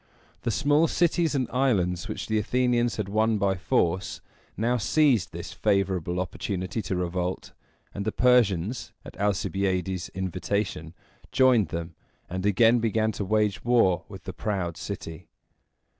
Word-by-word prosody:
The - - -2
small 145 +6 +3
cities 165 -2 +1
and 130 -3 0
islands 105 -8 +1
which 105 - -4
the 110 -1 0
Athenians 120 +1 +1
had 105 -3 -3
won 110 +2 +2
by 100 -1 +2
force 90 0 0 0.4
now 120 +4 +1
seized 130 - +2
this - - -7
favorable 90 -3 0
opportunity 95 +3 -3
to 95 - -3
revolt; 90 +1 -3 0.4
and 100 - -4
the 110 - -1
Persians, 120 -4 +2
at - - -10
Alcibiades' 95 -2 -1
invitation, 95 -2 -3 0.4
joined 125 -7 +4
them, 85 +2 -5 0.3
and 95 +3 -2
again 115 +4 +4
began 110 -1 +1
to 105 - -4
wage 105 0 0
war 105 -8 +3
with 95 -3 -10
the 95 - -6
proud 90 -4 -2
city. 80 -1 -7
100 Hz, 140 wpm, -26 LUFS, 90-115 Hz, 0.4 s, joined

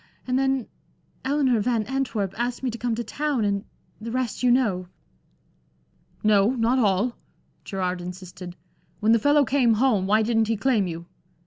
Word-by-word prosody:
And 255 0 0
then 270 -3 0 0.6
Eleanor 265 -3 +2
Van 225 0 +1
Antwerp 230 -6 -2
asked 240 +2 -3
me 255 - 0
to 235 - -6
come 240 -2 -1
to 235 - -3
town, 285 -4 -1
and 200 -1 -1 0.3
the 225 +2 -6
rest 250 -1 -2
you 250 - +3
know." 215 -8 +2 1.4
"No, 210 +3 +4
not 240 +2 +2
all." 210 +2 +1 0.5
Gerard 185 -2 -3
insisted. 180 0 -8 0.4
"When 215 +1 +3
the 230 - +5
fellow 290 +4 +4
came 255 -5 +3
home, 215 -5 +2
why 215 +2 +3
didn't 225 -1 +1
he 225 0 0
claim 220 -5 +1
you? 170 0 -6
230 Hz, 160 wpm, -24 LUFS, 200-255 Hz, 1.4 s, the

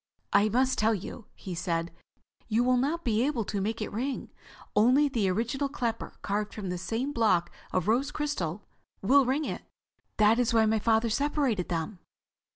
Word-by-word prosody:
"I 205 +1 +5
must 260 +4 +1
tell 220 +1 +3
you," 205 +3 -8
he 185 - -7
said, 170 -1 -2 0.6
"you 230 +2 +2
will 255 +1 +3
not 295 +7 0
be 225 -2 +1
able 260 -6 0
to 200 -1 -2
make 220 +2 -2
it - - -5
ring. 260 +6 -3 0.4
Only 255 +8 +5
the 230 -8 0
original 235 +8 -1
clapper, 235 -5 -3
carved 210 +1 -2
from 200 -4 -5
the 180 0 -3
same 235 +9 -2
block 205 -8 +2 0.2
of 185 -1 0
rose 250 +6 +2
crystal, 215 - -3 0.4
will 270 +6 +5
ring 285 +4 +1
it. - - -4 0.6
That 215 +2 +5
is 235 -1 +1
why 220 -1 +5
my 220 0 +2
father 225 +1 +2
separated 275 - 0
them." 175 +3 -3
225 Hz, 175 wpm, -28 LUFS, 205-260 Hz, 0.6 s, I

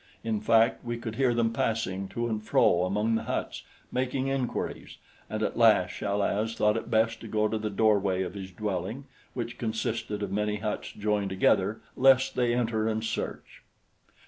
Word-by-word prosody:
In 110 -2 -1
fact, 115 +2 +3
we 120 -1 -3
could 115 -2 -5
hear 130 -2 +3
them 115 -1 +1
passing 100 -4 -1
to 120 +5 -3
and 110 -2 -2
fro 90 -4 +3
among 105 +4 0
the 110 - 0
huts, - - -3 0.3
making 130 +1 -1
inquiries, 135 -3 -3 0.3
and 110 0 -2
at - - -2
last 105 -6 +5
Chal 100 0 -1
az 110 +3 0
thought 105 0 +2
it 115 - -4
best 115 0 +1
to 115 - -8
go 110 0 +1
to 110 0 -2
the 110 0 -2
doorway 100 -3 +2
of 90 - -5
his 95 -2 -7
dwelling, 100 +5 -3 0.3
which 120 -2 -4
consisted 110 -2 -2
of 100 - -3
many 105 +1 0
huts 105 0 -4
joined 105 -1 -1
together, 95 +2 +2
lest 135 0 +5
they 120 -1 +1
enter 110 -2 0
and 110 0 -1
search. 110 - -5
110 Hz, 180 wpm, -28 LUFS, 105-115 Hz, 0.3 s, last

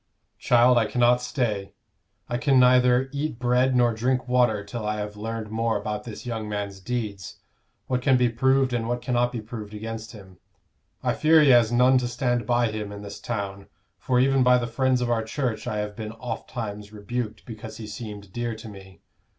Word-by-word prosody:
"Child, 120 0 +5
I 110 - +1
cannot 120 +2 +3
stay. 115 -6 -2 0.5
I 120 - -2
can 135 -2 +4
neither 125 0 +5
eat 145 -3 -3
bread 125 +1 +2
nor 120 -1 +3
drink 125 +3 0
water 120 -4 +2
till 110 +3 -6
I 105 0 -1
have 105 0 -5
learned 110 0 -5
more 115 0 0
about 105 +1 -4
this 115 +1 -8
young 110 -3 -4
man's 100 -2 -4
deeds, 105 -4 -4 0.5
what 125 -1 -1
can 130 0 +4
be 125 0 +3
proved 130 +2 +2
and 115 -1 -1
what 120 0 -2
cannot 120 -1 +1
be 120 -3 -4
proved 110 -1 -8
against 110 +1 -6
him. 95 -4 -14 0.6
I - - +1
fear 160 +1 +5
he 150 - +5
has 120 -3 +5
none 125 +2 +5
to 125 - -2
stand 120 -2 -1
by 120 -2 +2
him 105 -1 -5
in 100 0 -8
this 100 0 -8
town, 100 -4 -5 0.3
for 125 -1 +1
even 135 +1 +3
by 125 0 +5
the 120 - -1
friends 125 +2 +1
of 120 -1 0
our 115 -1 +2
church 115 -1 -3
I 105 - -2
have 105 0 -3
been 110 0 -6
ofttimes 110 -3 -6
rebuked 110 +1 -5
because 110 -1 -9
he 110 - -7
seemed 105 -2 -8
dear 120 -1 -3
to 110 +1 -10
me. 95 -2 -13
120 Hz, 200 wpm, -25 LUFS, 105-125 Hz, 0.6 s, Child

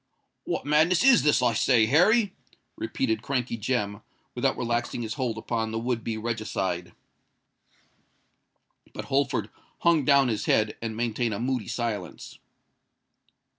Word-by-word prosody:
"What - - -3
madness 160 +6 +3
is 265 -2 +6
this, 150 -4 +3
I 120 -1 +3
say, 115 0 +3
Harry?" 195 - +3 0.4
repeated 110 -1 -2
Crankey 125 -2 -2
Jem, 105 -2 -2 0.3
without - - 0
relaxing 120 0 -2
his 110 -1 -4
hold 120 -4 -2
upon 110 0 -2
the 110 - -3
would 115 0 -2
be 110 -1 -3
regicide. 100 -6 -3 2.0
But - - -6
Holford 140 0 0 0.3
hung 170 -3 +3
down 140 -1 +4
his 110 -3 -2
head, 110 0 +2
and 110 -1 -4
maintained 115 -1 -1
a - - -5
moody 125 -1 -2
silence. 115 -4 -5
120 Hz, 135 wpm, -26 LUFS, 110-135 Hz, 2.0 s, is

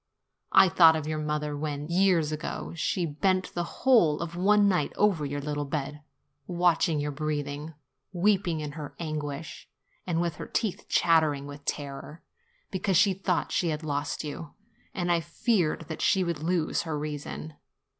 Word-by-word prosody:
I 190 - +7
thought 165 -2 +6
of 155 -2 -3
your 155 0 -2
mother 150 -1 -2
when, 145 0 -4
years 175 -3 +3
ago, 155 +2 -5
she 170 +2 0
bent 185 +5 0
the 175 +7 -5
whole 215 - +5
of 170 0 -5
one 205 +3 +4
night 180 -7 +1
over 185 -8 +2
your 145 +1 -3
little 145 0 -2
bed, 145 0 -4 0.5
watching 175 -2 +2
your 145 0 -2
breathing, 150 +1 -4 0.4
weeping 185 -3 +1
in 150 -1 -4
her 145 -1 -8
anguish, 155 -2 -5 0.4
and 170 -2 0
with 170 -2 -1
her - - -6
teeth 215 -5 -2
chattering 155 -4 +3
with 145 0 -9
terror, 145 +2 -5 0.5
be 190 - -2
cause 190 -2 +2
she 195 +1 +5
thought 185 -1 -1
that - - -6
she 175 - +1
had 155 0 -3
lost 145 0 -2
you; 150 +1 -7 0.4
and 175 -2 -1
I 170 - +3
feared 175 - 0
that 160 -1 -6
she 190 -2 +3
would 170 -3 -2
lose 170 -1 0
her 160 -3 -3
reason. 150 +1 -5
160 Hz, 170 wpm, -28 LUFS, 150-180 Hz, 0.5 s, I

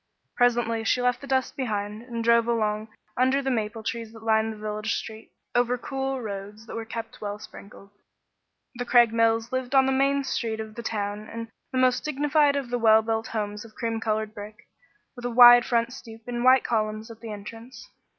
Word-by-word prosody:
Presently 235 -2 +2
she 235 - +1
left 245 0 +1
the 280 - -9
dust 260 -1 0
behind 210 -4 -3
and 235 -1 -5
drove 235 0 +4
along 215 -2 0 0.3
under 260 +2 +3
the 270 -1 -1
maple 220 -2 -2
trees 230 0 -4
that 225 -1 -13
lined 220 0 +2
the 215 - -9
village 215 +1 -3
street, 220 0 -7 0.2
over 245 0 +2
cool 270 +1 -3
roads 205 +1 -7
that - - -9
were 230 0 -4
kept 225 +1 -7
well 205 -1 -4
sprinkled. 200 -1 -13 0.8
The 245 -1 -4
Craigmiles 230 -1 +3
lived 260 +1 -2
on 265 0 +6
the 265 - +1
main 275 +1 +2
street 225 -4 -2
of 220 0 -6
the 235 - -7
town 210 -1 -4
in 230 0 -6 0.2
the 260 - -2
most 255 -1 +3
dignified 295 0 +2
of 270 -4 -3
the 245 - 0
well 220 -1 +5
built 225 0 -1
homes 210 -1 -4
of 225 -1 -15
cream 230 -2 -2
colored 215 -1 -2
brick, 210 0 -10 0.5
with 245 - -10
a - - 0
wide 240 0 +9
front 235 0 0
stoop 225 -3 -11
and 240 -1 -3
white 255 +1 +6
columns 215 0 -2
at 225 - -12
the 225 -1 -8
entrance. 225 +4 -10
230 Hz, 200 wpm, -26 LUFS, 220-245 Hz, 0.8 s, wide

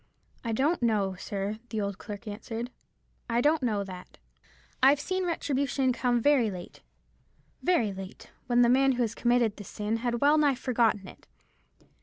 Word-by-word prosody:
"I 230 - -2
don't 280 +9 +1
know, 210 -5 +1
sir," 200 +3 -4
the 220 - -3
old 200 -2 -3
clerk 210 +1 -8
answered; 225 +3 -5 0.6
"I 235 0 +2
don't 300 +4 +3
know 215 -5 0
that. 185 -2 -10 0.6
I've 275 +2 +6
seen 370 +4 -2
retribution 275 -5 0
come 245 -1 +1
very 255 -3 +3
late, 180 -3 -9 0.8
very 240 - +2
late; 190 0 -10 0.2
when 245 0 +4
the - - +5
man 265 +2 +4
who 240 -2 +1
committed 240 -1 +1
the 205 - -8
sin 210 +3 -3
had 240 0 -1
well 295 +3 +4
nigh 290 -3 +3
forgotten 230 -6 +1
it. - - -14
235 Hz, 160 wpm, -28 LUFS, 210-270 Hz, 0.8 s, I've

